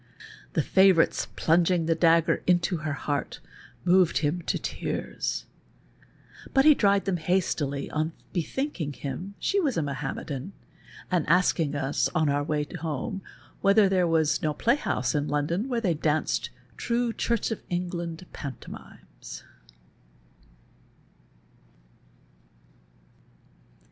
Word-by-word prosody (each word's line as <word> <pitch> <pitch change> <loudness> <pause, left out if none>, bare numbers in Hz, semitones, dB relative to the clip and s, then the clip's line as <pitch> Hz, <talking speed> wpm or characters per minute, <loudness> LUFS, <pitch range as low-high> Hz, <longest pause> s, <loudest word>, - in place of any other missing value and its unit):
The - - +1
faNourite's 190 -3 +4
plunging 170 +1 +3
the 165 - +3
dagger 165 0 +3
into 175 0 +2
her 150 -2 -3
luart 145 -3 -2 0.5
moved 180 -5 +4
him 150 +4 0
to - - +1
tears, - - -3 1.1
but 270 +1 +5
he 305 - +9
dried 200 -6 +2
them 190 -2 0
hastily 160 -5 0
on 155 +1 -1 0.2
l)ethinking 175 - -3
liiin 160 +9 -5
she 400 - +1
was 285 - 0
a 165 - +1
Mahometan, 140 +3 -4 0.6
and 175 -5 +1
asked 180 +2 +4
of 150 -3 0
us, 140 0 0
on 155 -3 +3
our 145 0 +1
way 150 0 -1
home, 160 +4 -3 0.4
whether 200 +1 +5
there 185 -2 +2
was 160 -2 +2
no 155 -1 0
|)layhouse 240 - +1
in 145 -1 0
London 165 - -1
where 240 -2 0
they 185 -6 +2
danced 155 0 0 0.3
true 235 0 0
Church 235 -1 -1
of 225 - -3
Kngland 175 -1 -3
panto 140 -4 -7
mimes. - - -11
170 Hz, 120 wpm, -27 LUFS, 150-190 Hz, 1.1 s, he